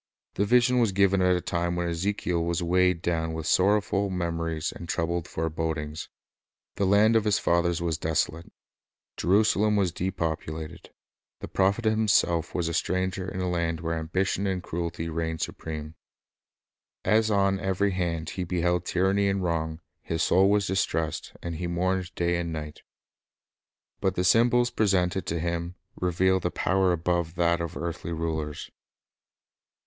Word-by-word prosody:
The 100 - 0
vision 125 +3 +4
was 115 -4 +3
given 100 0 +3
at 90 0 +4
a 90 - -1
time 85 0 -1
when 85 0 -1
Ezekiel 85 0 -1
was 85 +1 -1
weighed 90 0 +2
down 80 -1 -1
with 80 -1 -4
sorrowful 100 +2 +2
memories 85 -3 -2
and 85 - -10
troubled 85 0 -1
forebodings. 80 -1 -3 0.7
The 100 -1 +1
land 105 +3 +5
of 110 - +4
his 105 -1 +3
fathers 85 0 +1
was 80 -2 -1
desolate. 80 +1 -1 0.6
Jerusalem 105 +2 +3
was 95 -4 +2
depopulated. 80 -3 -4 0.5
The - - -6
prophet 100 +4 +1
himself 105 -7 +2
was 85 -2 0
a 85 - -2
stranger 95 +2 -1
in 95 - -4
a 90 - -1
land 85 -2 -1
where 85 0 -2
ambition 95 +5 -1
and 95 -2 -2
cruelty 85 -1 -4
reigned 80 0 -3
supreme. 80 -1 -5 1.1
As 110 +1 +3
on 100 -2 +2
every 95 +2 0
hand 85 -4 -2
he 95 - -3
beheld 90 0 0
tyranny 95 +2 +2
and 95 -1 0
wrong, 80 -1 -2 0.2
his 80 -1 -2
soul 95 +2 +4
was 100 -1 +2
distressed, 80 -4 -1
and 85 -2 -4
he 90 - -3
mourned 95 +1 -1
day 85 0 +1
and 85 -1 -3
night. 75 -1 -6 1.2
But 95 -1 0
the 90 - 0
symbols 120 +5 +4
presented 95 -3 +1
to 85 - -1
him 85 +1 -3 0.2
revealed 90 +1 +1
a - - 0
power 95 +1 +1
above 85 -1 -1
that 85 0 +2
of 85 +1 -4
earthly 85 0 -4
rulers. 80 -2 -3
85 Hz, 155 wpm, -27 LUFS, 85-95 Hz, 1.2 s, land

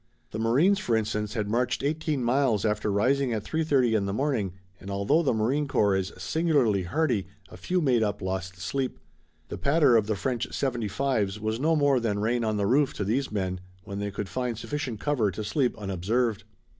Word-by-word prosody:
The 110 - -4
marines, 145 - +3
for 120 - 0
instance, 105 0 -2
had 105 -3 -1
marched 120 +5 0
eighteen 150 -2 -1
miles 120 -4 +2
after 105 -1 0
rising 130 +5 +2
at 110 -2 -2
3:30 140 -8 +1
in 100 -2 +1
the 100 - -2
morning, 115 -7 -1 0.3
and 95 - -9
although 100 +11 +2
the 150 - +1
marine 125 +7 0
corps 100 -6 +2
is 95 +1 -1
singularly 130 - +1
hardy, 120 - 0 0.2
a - - -11
few 180 0 -1
made 130 -6 +3
up 105 -2 0
lost 95 -1 -4
sleep. 130 +6 -2 0.5
The - - -6
patter 140 -3 +4
of 110 -2 +3
the 110 - 0
French 125 +3 -2
seventy 120 -5 -1
fives 105 -4 -1
was 110 +1 -2
no 160 +4 +2
more 145 -3 +3
than 110 -4 -1
rain 115 +3 0
on 110 -1 0
the 100 - 0
roof 135 +6 +3
to - - -2
these 120 +7 -1
men 95 -3 -2 0.2
when 100 0 -6
they 100 0 -2
could 100 0 -5
find 125 0 -3
sufficient 135 -3 -4
cover 130 -7 +1
to 100 +4 -5
sleep 125 +4 0
unobserved. 105 +3 -1
115 Hz, 200 wpm, -27 LUFS, 100-140 Hz, 0.5 s, patter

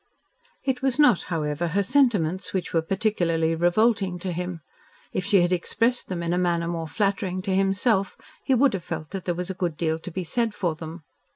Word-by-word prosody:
It 265 -2 -1
was 265 -1 +1
not, 270 - +5
however, 155 0 -1
her 200 +5 +1
sentiments 200 - +2
which 185 - -2
were 165 - +3
particularly 170 -4 0
revolting 180 +2 +2
to 185 - -2
him. 175 -1 -4 0.5
If 185 - -1
she 200 -2 +4
had 175 +1 +2
expressed 230 +7 0
them 175 -2 -3
in 170 0 0
a 180 - +1
manner 170 -2 +1
more 165 -1 -3
flattering 190 +1 -1
to 190 -2 0
himself 195 +1 +1 0.3
he 270 - +2
would 265 0 +4
have 190 -3 -3
felt 160 -2 -6
that 190 -2 -5
there 175 - 0
was 180 +2 -3
a - - -3
good 175 -4 -2
deal 160 -1 0
to 170 - -7
be 185 +2 -4
said 225 +5 -1
for 175 -5 0
them. 160 +1 -9
180 Hz, 205 wpm, -25 LUFS, 170-205 Hz, 0.5 s, not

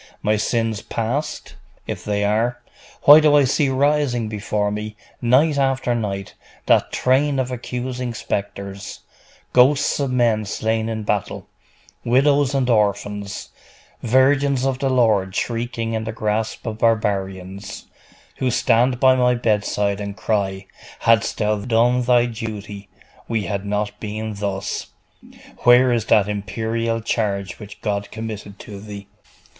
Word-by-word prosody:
My 105 +1 +2
sins 110 0 -1
past? 135 +7 -4 0.3
If - - -5
they 105 0 -1
are, 115 +4 0 0.4
why 145 +2 +10
do 150 -1 +4
I 145 - +6
see 135 +2 +1
rising 135 -4 +1
before 105 -1 -2
me, 105 0 -5 0.3
night 140 +5 +3
after 135 -2 +1
night, 100 -4 -3 0.3
that - - +3
train 135 +2 +2
of 130 -1 -1
accusing 125 0 -4
spectres, 100 -1 -5 0.5
ghosts 140 +4 +4
of 140 -2 0
men 120 -4 +1
slain 110 +2 -1
in 110 -1 -3
battle, 105 -2 -2 0.6
widows 140 +2 +3
and 135 -2 +1
orphans, 105 -2 -1 0.5
virgins 135 +2 +3
of 135 -1 -1
the 135 - 0
Lord 110 -7 +2
shrieking 115 0 -2
in 110 0 -2
the 110 - -3
grasp 110 +1 -2
of 110 -1 -4
barbarians, 100 -3 -1 0.5
who 130 - 0
stand 125 +1 +2
by 130 -1 +6
my 125 -1 +3
bedside 105 -3 0
and 100 -1 -6
cry, 95 -1 -1 0.4
"Hadst 115 -2 +2
thou 105 -1 +1
done 120 +3 +2
thy 120 -1 +3
duty, 105 -3 -7 0.4
we 115 -3 -1
had 100 +2 -4
not 105 0 -2
been 110 0 -4
thus! 100 -1 -3 0.7
Where 125 +1 +5
is 115 -2 0
that 105 -3 +4
imperial 115 +2 -2
charge 100 -5 -2
which 105 -1 -11
God 100 -1 -2
committed 105 -2 -7
to 100 -2 -9
thee?" 100 -1 -9
110 Hz, 135 wpm, -21 LUFS, 105-125 Hz, 0.7 s, why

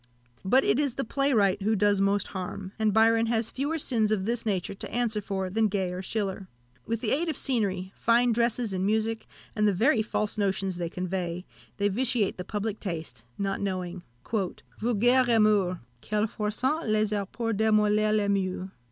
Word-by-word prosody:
But 255 +8 +4
it 215 +6 +2
is 280 -4 0
the 270 - -1
playwright 225 -7 +2
who 215 +3 +2
does 205 -1 +3
most 200 +1 +1
harm; 190 0 -5
and 215 -1 +2
Byron 225 +2 +4
has 225 -1 0
fewer 285 +5 -2
sins 225 -8 +1
of 195 -3 0
this 230 0 -1
nature 190 -2 -1
to 195 - -8
answer 230 -3 0
for 195 -1 -3
than 215 +4 +1
Gay 190 -3 -1
or 180 - -4
Schiller. 195 -1 -3 0.4
With 225 0 -2
the 220 - -1
aid 325 +4 +1
of 310 - -2
scenery, 195 -7 0
fine 235 +1 +3
dresses 235 -1 0
and 185 0 -1
music, 220 +2 0 0.3
and 210 -1 +2
the 205 - +3
very 235 - +3
false 215 -1 -2
notions 195 -2 0
they 170 -1 -3
convey, 180 0 -3 0.3
they 200 - +2
vitiate 230 0 0
the 180 - -4
public 210 +2 -3
taste, 160 - -6
not 195 -1 -2
knowing, 185 -2 -3 0.8
"Vulgaires 245 +3 +3
rimeurs! 210 -5 +3 0.2
Quelle 210 0 0
force 210 +1 -4
ont 300 +2 +1
les 215 0 +2
arts 200 -2 -2
pour 225 -1 -2
demolir 215 0 +3
les 210 -1 +2
moeurs." 190 -1 -1
210 Hz, 185 wpm, -27 LUFS, 195-230 Hz, 0.8 s, But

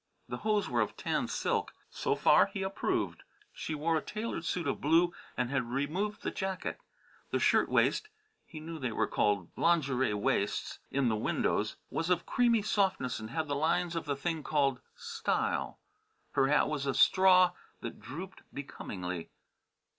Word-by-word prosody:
The - - -4
hose 215 -2 +1
were - - +1
of - - -2
tan - - -1
silk. - - -1 0.2
So - - 0
far - - +5
he 195 -3 -4
approved. 190 0 -1 0.3
She 155 - -4
wore 160 +2 +1
a - - -1
tailored 215 -4 -4
suit 175 -1 -1
of 140 - -1
blue 165 +4 +4 0.2
and 125 0 0
had 130 -4 0
removed 170 - -2
the - - -1
jacket. 190 -2 -3 0.5
The - - +1
shirtwaist 430 - +3 0.4
he 155 - -8
knew 160 +1 -7
they 125 -4 -2
were - - +1
called 100 -4 0
"lingerie 135 -9 +2
waists" 100 0 -1
in 140 -2 +1
the 110 - +2
windows 105 - 0 0.2
was 165 +2 -1
of 175 -1 +2
creamy 235 -4 +3
softness 190 - +1
and 110 0 -7
had 160 +4 -2
the 145 - -1
lines 170 +3 +1
of 165 - -2
the 145 -1 -1
thing 160 +3 -2
called 140 -4 +1 0.2
"style." - - -1 0.5
Her 135 - +3
hat 150 +2 +4
was 145 -2 -2
a 135 - 0
straw 185 -1 +6 0.3
that - - -6
drooped 175 - -8
becomingly. 90 -10 -6
155 Hz, 165 wpm, -31 LUFS, 135-180 Hz, 0.5 s, straw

